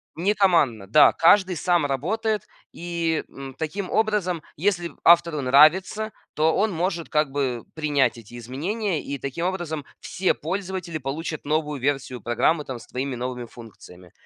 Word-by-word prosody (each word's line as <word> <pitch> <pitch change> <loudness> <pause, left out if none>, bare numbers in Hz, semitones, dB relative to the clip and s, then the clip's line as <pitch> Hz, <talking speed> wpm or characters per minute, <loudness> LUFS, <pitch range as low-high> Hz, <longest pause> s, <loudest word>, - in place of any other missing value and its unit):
Не 185 +6 +1
командно. 155 - +2
Да, 145 +8 +6
каждый 185 +2 +4
сам 175 -3 +1
работает, 210 - -1 0.2
и, 170 -2 -2
м, 135 -1 -9
таким 180 +6 -4
образом, 205 -7 0
если 175 0 0
автору 170 -3 +5
нравится, 170 +11 +4 0.2
то 160 +1 +2
он 210 +1 +1
может 170 0 -2
как 150 -2 +1
бы 130 -4 -2
принять 145 -6 +1
эти 115 +2 -12
изменения, 165 - -3
и, 140 - -4
таким 140 +7 -4
образом, 170 -6 -3
все 185 +1 0
пользователи 185 -1 -4
получат 155 +4 -5
новую 150 -1 -1
версию 135 -3 -2
программы, 150 +8 +1
там, 130 -3 -6
с - - -15
твоими 130 +1 -3
новыми 125 0 -4
функциями. 95 -7 -14
155 Hz, 145 wpm, -24 LUFS, 135-180 Hz, 0.2 s, Да